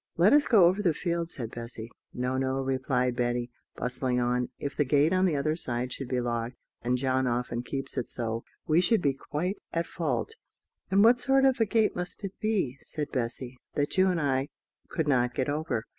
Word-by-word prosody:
"Let 180 Hz, +8 st, +6 dB
us 295 Hz, 0 st, +5 dB
go 210 Hz, -7 st, +7 dB
over 185 Hz, +4 st, +3 dB
the 170 Hz, -6 st, +2 dB
field," 170 Hz, -1 st, -2 dB
said 120 Hz, -8 st, -4 dB
Bessy. 115 Hz, -1 st, -7 dB, 0.2 s
"No, 125 Hz, +1 st, -2 dB
no," 130 Hz, 0 st, 0 dB
replied 130 Hz, -1 st, 0 dB
Betty, 120 Hz, 0 st, -1 dB, 0.2 s
bustling 125 Hz, +1 st, -1 dB
on. 125 Hz, 0 st, 0 dB
"If 140 Hz, -, -4 dB
the 145 Hz, -, +3 dB
gate 145 Hz, +4 st, +3 dB
on 185 Hz, 0 st, +3 dB
the 165 Hz, -, +1 dB
other 155 Hz, +2 st, 0 dB
side 125 Hz, -5 st, -3 dB
should 135 Hz, -, -5 dB
be 125 Hz, 0 st, 0 dB
locked 120 Hz, 0 st, -2 dB, 0.3 s
and 125 Hz, +1 st, +1 dB
John 130 Hz, 0 st, +1 dB
often 120 Hz, 0 st, -1 dB
keeps 135 Hz, +2 st, -4 dB
it 120 Hz, -, -4 dB
so 115 Hz, -1 st, -3 dB, 0.2 s
we 160 Hz, +3 st, +4 dB
should 185 Hz, +2 st, +2 dB
be 140 Hz, -2 st, +3 dB
quite 165 Hz, +8 st, -3 dB
at 165 Hz, 0 st, 0 dB
fault." 140 Hz, -11 st, -2 dB, 0.6 s
"And 195 Hz, +2 st, +5 dB
what 240 Hz, +2 st, +6 dB
sort 270 Hz, +2 st, +3 dB
of 265 Hz, -1 st, +3 dB
a 225 Hz, -, +3 dB
gate 220 Hz, +1 st, +2 dB
must 180 Hz, +3 st, -5 dB
it 195 Hz, -1 st, -4 dB
be," 195 Hz, -, 0 dB
said 150 Hz, -2 st, -5 dB
Bessy, 125 Hz, 0 st, -3 dB, 0.2 s
"that 145 Hz, 0 st, 0 dB
you 190 Hz, 0 st, +5 dB
and 180 Hz, -3 st, +1 dB
I 135 Hz, -1 st, 0 dB, 0.4 s
could 160 Hz, -2 st, -1 dB
not 125 Hz, -3 st, +2 dB
get 130 Hz, +1 st, 0 dB
over?" 150 Hz, -6 st, -1 dB
135 Hz, 205 wpm, -28 LUFS, 125-175 Hz, 0.6 s, go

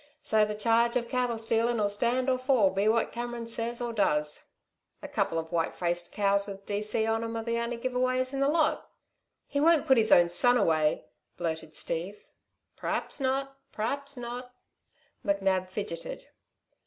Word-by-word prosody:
So 215 Hz, -1 st, +4 dB
the 210 Hz, 0 st, -4 dB
charge 230 Hz, +2 st, +2 dB
of 235 Hz, -1 st, -3 dB
cattle 250 Hz, -2 st, 0 dB
stealin' 225 Hz, +1 st, +1 dB
'll 205 Hz, -, +2 dB
stand 240 Hz, +5 st, 0 dB
or 255 Hz, -1 st, +2 dB
fall 255 Hz, -7 st, +3 dB
be 195 Hz, +2 st, 0 dB
what 225 Hz, +1 st, +2 dB
Cameron 240 Hz, 0 st, -5 dB
says 230 Hz, +1 st, -3 dB
or 240 Hz, -1 st, -3 dB
does. 150 Hz, -8 st, 0 dB, 0.6 s
A -, -, -5 dB
couple 165 Hz, -, -1 dB
of 160 Hz, 0 st, -4 dB
white 165 Hz, -1 st, 0 dB
faced 175 Hz, 0 st, -2 dB
cows 200 Hz, 0 st, +1 dB
with 195 Hz, 0 st, -8 dB
D.C. 210 Hz, +2 st, -1 dB
on 225 Hz, 0 st, 0 dB
'm 230 Hz, 0 st, -4 dB
are 225 Hz, -, -3 dB
the 235 Hz, 0 st, -1 dB
only 235 Hz, 0 st, -2 dB
give 255 Hz, +2 st, -3 dB
aways 255 Hz, +1 st, +1 dB
in 275 Hz, -, -2 dB
the 275 Hz, -, +3 dB
lot!" 310 Hz, +1 st, +1 dB, 0.6 s
"He 285 Hz, -, -2 dB
won't 320 Hz, 0 st, +4 dB
put 265 Hz, -, +5 dB
his 220 Hz, -, +2 dB
own 175 Hz, 0 st, +7 dB
son 245 Hz, +8 st, +5 dB
away," 155 Hz, -7 st, +2 dB, 0.3 s
blurted 160 Hz, -2 st, -4 dB
Steve. 180 Hz, +8 st, -3 dB, 0.5 s
"P'raps! -, -, -3 dB, 0.5 s
P'raps 280 Hz, +5 st, -3 dB
not!" 245 Hz, +1 st, -7 dB, 0.7 s
McNab 195 Hz, -2 st, +1 dB
fidgeted. 185 Hz, -4 st, -6 dB
225 Hz, 170 wpm, -29 LUFS, 195-245 Hz, 0.7 s, own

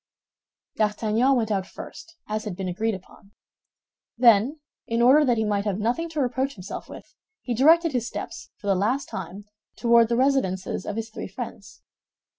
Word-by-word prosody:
D'Artagnan 220 Hz, +5 st, +2 dB
went 225 Hz, -3 st, 0 dB
out 195 Hz, -2 st, -1 dB
first, 335 Hz, 0 st, -11 dB
as 215 Hz, +1 st, -3 dB
had 205 Hz, -4 st, -4 dB
been 190 Hz, 0 st, -4 dB
agreed 215 Hz, +4 st, -1 dB
upon. 195 Hz, +2 st, -15 dB, 0.8 s
Then, 240 Hz, +5 st, +5 dB, 0.3 s
in 230 Hz, 0 st, -1 dB
order 260 Hz, +6 st, +6 dB
that 245 Hz, -4 st, +2 dB
he 220 Hz, -, +1 dB
might 205 Hz, -1 st, 0 dB
have 200 Hz, -3 st, -1 dB
nothing 245 Hz, +11 st, -1 dB
to 320 Hz, -2 st, -4 dB
reproach 265 Hz, +1 st, -1 dB
himself 190 Hz, 0 st, -8 dB
with, -, -, -12 dB, 0.3 s
he 245 Hz, -, -2 dB
directed 325 Hz, +7 st, +5 dB
his 245 Hz, -3 st, -1 dB
steps, -, -, -7 dB
for -, -, -14 dB
the 200 Hz, -, +3 dB
last 220 Hz, +9 st, 0 dB
time, 190 Hz, +2 st, -7 dB, 0.3 s
toward 235 Hz, -1 st, +4 dB
the 235 Hz, -, +1 dB
residences 250 Hz, -10 st, 0 dB
of 205 Hz, -, -3 dB
his 225 Hz, 0 st, -4 dB
three -, -, -6 dB
friends. -, -, -9 dB
225 Hz, 175 wpm, -25 LUFS, 205-260 Hz, 0.8 s, order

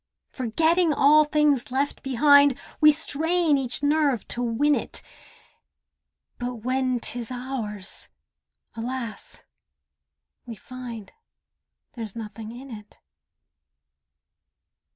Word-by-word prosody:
Forgetting 320 Hz, +8 st, +2 dB
all 300 Hz, +2 st, +5 dB
things 295 Hz, -4 st, +2 dB
left 275 Hz, +3 st, -1 dB
behind, 285 Hz, +1 st, +5 dB, 0.2 s
We 305 Hz, 0 st, +8 dB
strain 320 Hz, +1 st, +1 dB
each 265 Hz, 0 st, -1 dB
nerve 290 Hz, -4 st, +2 dB
to 240 Hz, -, -2 dB
win 245 Hz, +5 st, +2 dB
it, -, -, -2 dB, 1.4 s
But 245 Hz, 0 st, -3 dB
when 255 Hz, 0 st, 0 dB
'tis 235 Hz, 0 st, -4 dB
ours—alas! 245 Hz, -6 st, -5 dB, 2.4 s
we 230 Hz, -, -6 dB
find 235 Hz, -2 st, -9 dB, 0.8 s
There's 225 Hz, -4 st, -7 dB
nothing 220 Hz, 0 st, -7 dB
in 255 Hz, +3 st, -10 dB
it. 210 Hz, -2 st, -11 dB
260 Hz, 90 wpm, -25 LUFS, 235-295 Hz, 2.4 s, We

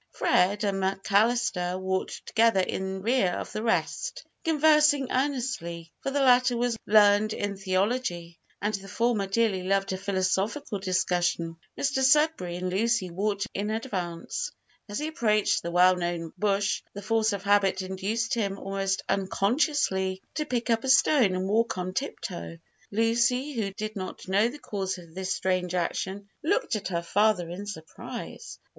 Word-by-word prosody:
Fred 195 Hz, +4 st, +2 dB
and 195 Hz, -1 st, 0 dB
McAllister 195 Hz, -1 st, +1 dB
walked 190 Hz, 0 st, -3 dB
together 225 Hz, -4 st, +3 dB
in 190 Hz, +1 st, -3 dB
rear 225 Hz, -6 st, +2 dB
of -, -, -5 dB
the 215 Hz, -, -3 dB
rest, 360 Hz, -, -1 dB, 0.2 s
conversing 300 Hz, -3 st, +4 dB
earnestly, 250 Hz, -, -2 dB
for -, -, -2 dB
the 280 Hz, +1 st, 0 dB
latter 250 Hz, -1 st, +4 dB
was 240 Hz, -1 st, 0 dB
learned 210 Hz, 0 st, +5 dB
in 205 Hz, -1 st, -3 dB
theology, 185 Hz, -3 st, -1 dB, 0.2 s
and 210 Hz, +2 st, -1 dB
the 195 Hz, -1 st, -5 dB
former 225 Hz, -1 st, 0 dB
dearly 200 Hz, -2 st, +1 dB
loved 195 Hz, +1 st, 0 dB
a 185 Hz, -, -4 dB
philosophical 195 Hz, +4 st, -1 dB
discussion. 180 Hz, -3 st, 0 dB, 0.2 s
Mr 275 Hz, -1 st, 0 dB
Sudberry 275 Hz, -, +3 dB
and 180 Hz, 0 st, -3 dB
Lucy 215 Hz, -1 st, +1 dB
walked 200 Hz, +2 st, -1 dB
in 205 Hz, +1 st, -2 dB
advance. 215 Hz, -, -3 dB, 0.4 s
As 205 Hz, -, -4 dB
he 300 Hz, -, -2 dB
approached 220 Hz, -9 st, +1 dB
the 170 Hz, -, -4 dB
well 180 Hz, +1 st, +5 dB
known 175 Hz, -2 st, -3 dB
bush, 200 Hz, -1 st, 0 dB
the 205 Hz, -, -7 dB
force 225 Hz, +1 st, +2 dB
of 200 Hz, -1 st, -4 dB
habit 200 Hz, -1 st, +3 dB
induced 200 Hz, +5 st, -2 dB
him 200 Hz, -4 st, -1 dB
almost 195 Hz, 0 st, -2 dB
unconsciously 195 Hz, -1 st, 0 dB
to 305 Hz, -, -2 dB
pick 240 Hz, -1 st, -1 dB
up 225 Hz, 0 st, +1 dB
a 265 Hz, -, -2 dB
stone 260 Hz, -7 st, +5 dB
and 185 Hz, +1 st, -2 dB
walk 225 Hz, +1 st, +1 dB
on 185 Hz, 0 st, -3 dB
tip 275 Hz, +8 st, -3 dB
toe. 170 Hz, -3 st, -6 dB, 0.3 s
Lucy, 235 Hz, +6 st, +1 dB
who 215 Hz, -5 st, -2 dB
did 215 Hz, +2 st, -5 dB
not 185 Hz, -1 st, -6 dB
know 200 Hz, +4 st, +3 dB
the 255 Hz, +5 st, -6 dB
cause 195 Hz, -8 st, -3 dB
of 170 Hz, -2 st, -13 dB
this 190 Hz, +1 st, -4 dB
strange 180 Hz, -1 st, 0 dB
action, 190 Hz, +3 st, -2 dB
looked 405 Hz, -, 0 dB
at 205 Hz, -3 st, -3 dB
her 170 Hz, -2 st, -2 dB
father 205 Hz, -1 st, +2 dB
in 200 Hz, +4 st, -6 dB
surprise. 160 Hz, -6 st, -8 dB
200 Hz, 160 wpm, -27 LUFS, 185-235 Hz, 0.4 s, learned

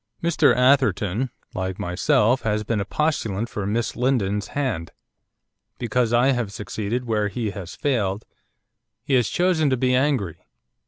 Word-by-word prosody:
'Mr 170 Hz, -1 st, +4 dB
Atherton, 125 Hz, -3 st, +2 dB, 0.2 s
like 95 Hz, 0 st, -3 dB
myself, 105 Hz, +7 st, +2 dB
has 105 Hz, -1 st, -1 dB
been 110 Hz, 0 st, -1 dB
a -, -, -3 dB
postulant 120 Hz, -9 st, -1 dB
for 100 Hz, -4 st, -4 dB
Miss 115 Hz, +2 st, -1 dB
Lindon's 105 Hz, -6 st, 0 dB
hand. 125 Hz, -, -1 dB, 0.9 s
Because 120 Hz, 0 st, 0 dB
I 120 Hz, +3 st, +4 dB
have 120 Hz, -6 st, -1 dB
succeeded 105 Hz, +4 st, -4 dB
where 105 Hz, -3 st, 0 dB
he 105 Hz, +1 st, -3 dB
has 100 Hz, -4 st, -8 dB
failed, 105 Hz, -7 st, -1 dB, 0.8 s
he 140 Hz, -, -2 dB
has 125 Hz, -4 st, +3 dB
chosen 175 Hz, -4 st, +2 dB
to 130 Hz, -, +1 dB
be 125 Hz, +1 st, +1 dB
angry. 130 Hz, -, 0 dB
115 Hz, 145 wpm, -23 LUFS, 100-130 Hz, 0.9 s, Mr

